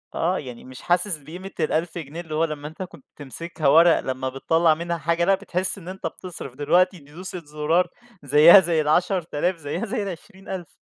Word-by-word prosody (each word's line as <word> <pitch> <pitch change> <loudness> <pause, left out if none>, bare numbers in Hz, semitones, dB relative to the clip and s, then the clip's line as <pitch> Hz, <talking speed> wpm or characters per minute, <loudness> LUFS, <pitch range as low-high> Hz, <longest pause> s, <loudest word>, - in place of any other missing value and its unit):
آه. 180 +3 0
يعني 125 -4 -9
مش 130 0 -12
حاسس 180 0 +1
بقيمة 175 +7 -10
ال1000 165 +2 -1
جنيه، 165 +1 -6
اللي 155 -3 -7
هو 160 - +2
لمّا 150 -2 -6
أنت 160 +4 -7
كنت 160 -6 -13
تمسكها 155 +2 -4
وَرَق 165 +3 +6
لمّا 130 0 -3
بتطلع 160 +5 +2
منها 170 +2 -3
حاجة 170 +2 0
لأ، 195 +1 +4
بتحِس 185 0 -1
إن 180 -3 -12
أنت 190 +1 -5
بتصرف، 170 -8 -9
دلوقتي 175 +6 +2
دوسة 170 +6 -8
زُرار 155 +4 +1 0.4
زيّها 150 +7 +8
زي 170 -3 +1
ال10.000، 175 +2 0
زّيها 165 +6 -4
زي 215 -1 -3
ال20.000. 190 -1 -8
165 Hz, 175 wpm, -23 LUFS, 150-180 Hz, 0.4 s, زيّها